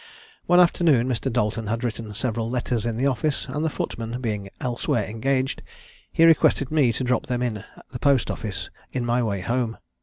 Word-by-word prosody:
One 175 0 +6
afternoon 165 -8 +4
Mr. 130 +1 -1
Dalton 110 -2 0
had 115 +3 -2
written 115 -2 -3
several 115 -1 -2
letters 120 -2 -1
in 115 - -1
the 125 +4 0
office, 140 +2 0
and 150 - -3
the 160 - +2
footman 115 -4 -4
being 105 -5 -3
elsewhere 120 -3 -1
engaged, 130 +5 -1 0.5
he 165 - +5
requested 155 -4 +4
me 145 -6 +4
to 130 - -3
drop 125 0 0
them 125 -1 -1
in 110 -4 -2 0.3
the 125 - -6
post 140 -2 +3
office 105 -3 -5 0.2
in 125 -2 -2
my 120 +1 +2
way 100 -5 -1
home. 115 +3 -1
120 Hz, 185 wpm, -24 LUFS, 115-135 Hz, 0.5 s, One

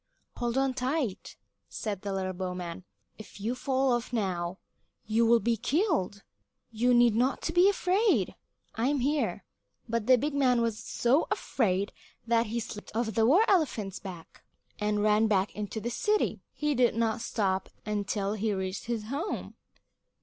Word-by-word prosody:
"Hold 240 +1 -1
on 270 -1 +2
tight," 255 -4 -2 0.3
said 205 -4 -4
the 200 - -4
little 190 -1 -2
bowman. 180 -1 -5 0.3
"If 215 - -11
you 220 +4 -1
fall 265 0 +1
off 240 0 -1
now, 185 -5 -2 0.5
you 225 +2 +2
will 235 0 +6
be 230 +3 +1
killed. 285 - 0 0.5
You 235 +3 +2
need 240 -2 +5
not 255 +4 +1
be 355 +3 +6
afraid; 370 - +2 0.4
I 230 +3 0
am 285 -2 +1
here." 290 +3 0 0.4
But 230 -1 -2
the 255 -1 +7
big 290 +4 -2
man 255 -4 +3
was 230 -2 0
so 255 +6 +1
afraid 200 -5 0 0.3
that 230 0 +2
he 230 +2 -2
slipped 215 -2 -8
down 230 0 0
off - - -5
the 225 +1 +3
war 360 - +5
elephant's 235 - +1
back, 180 -4 -10 0.4
and 210 0 0
ran 215 +1 +4
back 200 -2 +1
into 210 +1 -4
the 240 +2 -3
city. 425 - 0
He 300 0 -1
did 245 -4 +3
not 230 0 0
stop 195 -4 -1 0.2
until 205 -1 -1
he 215 0 -1
reached 190 0 -4
his 235 -2 -2
home. 295 +9 -3
230 Hz, 165 wpm, -29 LUFS, 205-260 Hz, 0.5 s, the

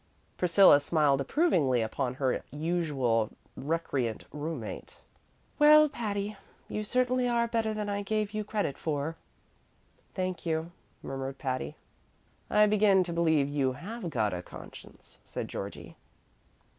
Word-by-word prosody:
Priscilla 180 -3 +6
smiled 145 -2 +2
approvingly 140 - +2
upon 125 +3 -2
her 130 -1 0
usually 145 -8 0 0.3
recreant 135 -6 -2
room 150 -2 -4
mate. 110 - -8 0.6
"Well, 305 0 +8
Patty, 210 -5 -3 0.3
you 215 - -3
certainly 250 +2 +1
are 235 -1 +2
better 225 -1 0
than 215 -1 -3
I 200 0 -1
gave 210 0 -1
you 215 0 -2
credit 205 -8 -2
for!" 155 +1 -2 1.0
"Thank 185 -1 -2
you," 160 0 -2 0.3
murmured 135 0 -5
Patty. 130 -1 -3 0.7
"I 210 - +5
begin 205 -2 +4
to 175 -1 -5
believe 160 -4 +2
you 140 -2 0
have 200 - -6
got 110 - 0
a 90 - -3
conscience," - - -13
said - - -5
Georgie. - - -7
170 Hz, 130 wpm, -29 LUFS, 135-210 Hz, 1.0 s, Well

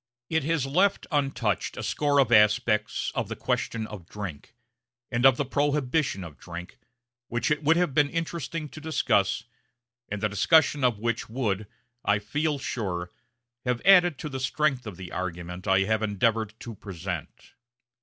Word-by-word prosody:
It 160 -2 +2
has 160 -3 +1
left 185 +9 +2
untouched 135 - 0
a - - -4
score 145 -1 +1
of 130 -4 +4
aspects 105 0 +3
of - - -2
the - - -3
question 115 -1 -2
of 100 -6 -9
drink, 95 -8 -7 0.6
and 120 +2 +5
of 130 -2 +4
the 145 - 0
prohibition 140 - 0
of 80 -4 -10
drink, 90 +1 -9 0.5
which 120 +5 -1
it 150 - +1
would 160 +2 +4
have 175 -6 +1
been 145 0 +3
interesting 165 -2 -3
to 155 - -10
discuss, 115 -9 +1 0.7
and 105 - -3
the 105 - +1
discussion 145 - +3
of 120 -4 +3
which 115 +1 -2
would, 110 -4 -1 0.4
I 105 0 +3
feel 145 +9 -1
sure, 95 -9 -3 0.5
have 125 -2 0
added 180 -5 +6
to 150 - -5
the 135 -2 -4
strength 130 -1 0
of 100 -5 -7
the 90 -1 -8
argument 90 +1 -5
I 95 0 +4
have 110 +2 +1
endeavored 110 +1 0
to 115 - -6
present. 90 -5 -7
120 Hz, 165 wpm, -27 LUFS, 100-145 Hz, 0.7 s, added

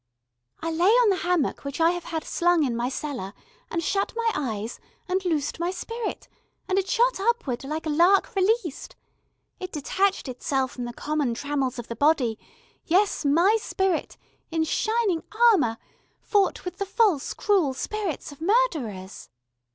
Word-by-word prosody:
"I 330 - -1
lay 340 +4 +3
on 475 0 +5
the 380 - +1
hammock 350 -5 0
which 280 +1 -5
I 330 +1 +5
have 350 -1 -5
had 320 -2 -3
slung 350 -2 +2
in 250 -4 0
my 240 +2 -1
cellar, 260 -8 -5 0.3
and 335 0 -2
shut 395 +5 0
my 460 -1 +1
eyes, 225 -5 -3 0.3
and 375 +1 0
loosed 320 -4 -1
my 340 +1 0
spirit, 455 +4 -5 0.4
and 380 +1 +2
it 390 0 -3
shot - - +2
upward 395 - 0
like 310 +4 -4
a - - -1
lark 350 +6 +4
released. 385 - 0 0.6
It 370 -1 -6
detached 380 +5 0
itself 260 +1 -1
from 245 - -5
the 240 - -5
common 290 -3 -1
trammels 275 -1 -2
of 240 - -6
the 230 - -5
body, 260 -5 +2 0.4
yes, 380 +3 +2
my 345 +10 +4
spirit, 380 -5 -1 0.3
in 325 -1 0
shining 425 +1 0 0.3
armour, 240 - +1 0.4
fought 400 -4 +1
with 360 0 -6
the 400 - -2
false, 395 - +2
cruel 365 -11 +2
spirits 395 -4 -4
of 285 - -14
murderers." 310 - 0
335 Hz, 160 wpm, -25 LUFS, 275-390 Hz, 0.6 s, on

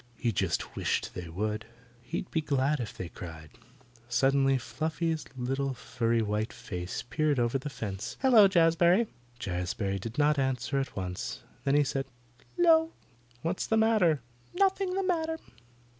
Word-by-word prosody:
He 120 - 0
just 95 -4 -1
wished - - -1
they 90 -2 -6
would. 105 +5 -2 0.3
He'd 165 +8 -5
be 160 - +1
glad 140 0 +1
if 115 -4 -5
they 90 - -4
cried. 80 -3 -9 0.6
Suddenly 135 +1 +3
Fluffy's 160 +4 -2
little 135 +2 -1
furry 115 -1 0
white 105 +1 -1
face 90 -2 -5
peered 150 +2 +1
over 120 +3 +1
the 145 - -5
fence. 105 -4 -5
"Hello, 240 -6 +7
Jazbury." 175 +3 +4 0.3
Jazbury 95 0 -2
did 115 +5 -6
not 150 0 +3
answer 135 +1 0
at 135 - -4
once. 90 -2 -4 0.2
Then 140 0 +3
he 145 - +5
said, 135 -1 -2 0.5
"'Lo!" 325 -2 +5 0.5
"What's 170 +3 -1
the 220 - +2
matter?" 215 - +4 0.3
"Nothing 385 -1 +2
the 390 - 0
matter." 325 -3 0
135 Hz, 145 wpm, -29 LUFS, 110-170 Hz, 0.6 s, Hello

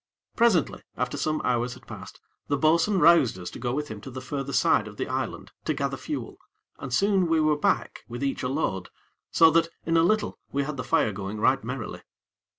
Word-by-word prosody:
Presently, 225 - +2 0.2
after 125 0 -1
some 155 0 -1
hours 125 0 0
had 130 -1 -16
passed, - - -10 0.3
the 145 - +1
bo'sun 165 +7 +3
roused 170 - +5
us 90 -1 -7
to - - -9
go 120 - -2
with 150 +3 -3
him 105 -2 -7
to 135 - -8
the 130 0 -7
further 135 +1 -4
side - - +3
of - - -11
the - - -2
island - - -4
to - - 0
gather - - -1
fuel, - - -6 0.4
and 130 - -6
soon 195 +5 +3
we 165 -1 +2
were 155 -1 +3
back 145 - 0
with 120 +3 -6
each 140 - -1
a 125 - -1
load, 100 - -2 0.4
so 165 -1 +6
that 165 +1 +3 0.2
in 165 0 +2
a - - +6
little 210 +6 +1
we 140 0 0
had 145 0 -5
the 125 - -3
fire 115 - +2
going 100 +2 -5
right 130 +3 +3
merrily. 125 -1 -5
140 Hz, 215 wpm, -26 LUFS, 125-165 Hz, 0.4 s, so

